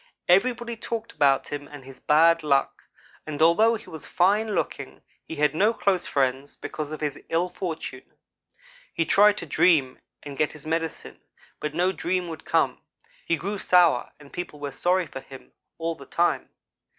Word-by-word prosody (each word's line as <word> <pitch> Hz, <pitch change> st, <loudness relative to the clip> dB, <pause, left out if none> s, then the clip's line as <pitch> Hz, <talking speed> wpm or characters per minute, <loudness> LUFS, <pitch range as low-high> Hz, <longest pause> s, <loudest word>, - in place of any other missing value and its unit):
Everybody 235 Hz, +5 st, +2 dB
talked 230 Hz, 0 st, -5 dB
about 140 Hz, -3 st, +2 dB
him 145 Hz, 0 st, -5 dB
and 145 Hz, -3 st, -12 dB
his 135 Hz, -1 st, -12 dB
bad 165 Hz, +2 st, +4 dB
luck, 140 Hz, -3 st, 0 dB, 0.4 s
and 150 Hz, -2 st, -5 dB
although 190 Hz, +9 st, +5 dB
he 220 Hz, -, -10 dB
was 160 Hz, -, -9 dB
fine 205 Hz, +4 st, +1 dB
looking, -, -, -4 dB, 0.2 s
he 160 Hz, -, -6 dB
had 150 Hz, -1 st, +2 dB
no 210 Hz, +8 st, +2 dB
close 190 Hz, -5 st, 0 dB
friends, 135 Hz, +1 st, -1 dB
because 155 Hz, -1 st, -6 dB
of 155 Hz, -, -6 dB
his 150 Hz, -2 st, -3 dB
ill 170 Hz, +2 st, +1 dB
fortune. 175 Hz, -3 st, -6 dB, 0.8 s
He 165 Hz, -, +1 dB
tried 205 Hz, +4 st, +5 dB
to -, -, -5 dB
dream 145 Hz, -4 st, +2 dB, 0.2 s
and 140 Hz, -2 st, -8 dB
get 150 Hz, -, +1 dB
his 150 Hz, -2 st, -12 dB
medicine 165 Hz, 0 st, -4 dB, 0.4 s
but 150 Hz, 0 st, -4 dB
no 180 Hz, +2 st, +2 dB
dream 180 Hz, +1 st, -2 dB
would 160 Hz, -2 st, -8 dB
come. -, -, +1 dB, 0.5 s
He 165 Hz, -, +2 dB
grew 200 Hz, +6 st, -4 dB
sour 180 Hz, -3 st, +3 dB
and 145 Hz, -1 st, -16 dB
people 175 Hz, -4 st, -6 dB
were 145 Hz, -1 st, -5 dB
sorry 180 Hz, +3 st, +1 dB
for 140 Hz, -, -8 dB
him 135 Hz, 0 st, -13 dB, 0.3 s
all 165 Hz, 0 st, -2 dB
the 140 Hz, -4 st, -13 dB
time. 175 Hz, +1 st, 0 dB
165 Hz, 175 wpm, -25 LUFS, 145-185 Hz, 0.8 s, although